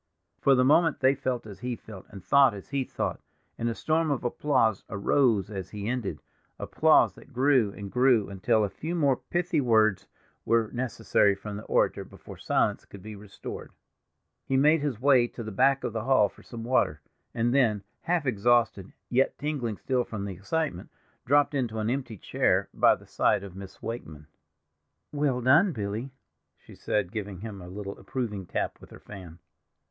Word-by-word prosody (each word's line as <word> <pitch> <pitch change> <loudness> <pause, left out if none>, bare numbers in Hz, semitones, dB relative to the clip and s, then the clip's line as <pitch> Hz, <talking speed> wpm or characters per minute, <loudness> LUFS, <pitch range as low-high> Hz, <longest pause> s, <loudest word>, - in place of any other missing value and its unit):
For 135 - +4
the 125 0 +3
moment 160 +4 +4
they 130 +1 +5
felt 125 -3 -3
as 105 -3 -10
he 125 0 -3
felt, 105 -4 -12
and 100 -3 -11
thought 140 -5 +5
as 100 - -11
he 140 -1 -1
thought, - - -4 0.4
and 115 - 0
a 115 - -3
storm 160 0 0
of 140 -3 -1
applause 120 -4 +1
arose 105 -1 +1
as 95 -3 -6
he 105 -1 -6
ended—applause 125 -4 0
that - - -17
grew 130 -4 +3
and 100 -2 -8
grew 125 -4 +3
until 100 +3 +1
a 105 - 0
few 165 +3 -5
more 140 -5 +3
pithy 175 -3 -1
words 110 -5 +2 0.4
were 115 -2 +1
necessary 115 -5 +1
from 100 +1 -7
the 105 - -8
orator - - +1
before - - -13
silence - - 0
could 100 -2 -13
be 110 0 -8
restored. 100 0 -9 0.7
He 135 - +1
made 150 +3 +4
his 140 -7 -2
way 130 -2 +4
to 120 - -8
the 110 - -6
back 135 +6 +2
of - - -3
the 110 0 -3
hall 130 -6 +4
for - - -19
some 115 -2 -9
water, 115 -11 +1 0.4
and 120 +1 +1
then, 115 -7 +2 0.2
half 170 -3 0
exhausted, 115 -4 +1
yet 130 +2 +1
tingling 135 -8 -3
still 130 -2 0
from 100 -4 -6
the 100 - -5
excitement, 100 - -3 0.4
dropped 145 +2 +3
into 120 -5 -2
an 110 +1 -1
empty 125 -5 -4
chair - - 0
by - - +5
the - - -17
side 100 - +1
of 95 -3 -10
Miss 100 0 -11
Wakeman. 80 -10 -7 0.9
"Well 145 -4 0
done, 155 +9 +4
Billy," 105 +3 -4 0.5
she - - -16
said, 100 -4 -2
giving 100 -4 -5
him 105 -3 -7
a 90 - -10
little 100 +1 -7
approving 105 -2 -4
tap - - -3
with - - -14
her - - -13
fan. 90 -5 -11
115 Hz, 180 wpm, -27 LUFS, 100-135 Hz, 0.9 s, they